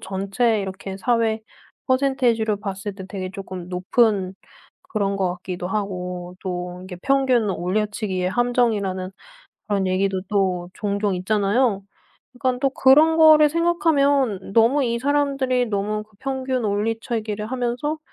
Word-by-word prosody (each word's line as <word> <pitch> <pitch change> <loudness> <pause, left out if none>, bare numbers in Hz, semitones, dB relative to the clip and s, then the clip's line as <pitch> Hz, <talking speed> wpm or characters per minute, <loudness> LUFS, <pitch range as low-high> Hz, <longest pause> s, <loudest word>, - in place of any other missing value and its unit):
전체 200 +3 0
이렇게 190 0 -6
사회 225 0 +1 0.5
퍼센테이지로 255 -5 +1
봤을 195 0 -5
때 190 -1 -8
되게 190 -2 -5
쪼금 185 -2 -8
높은 190 +1 +1 0.6
그런 200 -2 0
것 185 -2 0
같기도 180 0 -6
하고 180 -3 -4
또 180 -1 -5
이게 185 -1 -8
평균 260 -6 +2
올려치기의 190 0 -1
함정이라는 210 -5 0 0.6
그런 200 -2 0
얘기도 190 0 0
또 185 -4 0
종종 200 -1 -1
있잖아요. 200 +3 +1 0.5
그러니깐 250 0 -1
또 275 - +2
그런 300 +5 +5
거를 310 -1 +7
생각하면 285 - +1
너무 235 +6 +4
이 235 -1 0
사람들이 275 -2 +1
너무 210 0 -2 0.2
평균 265 -2 -2
올려치기를 215 0 -2
하면서 250 +5 -2
210 Hz, 295 characters per minute, -22 LUFS, 190-255 Hz, 0.6 s, 거를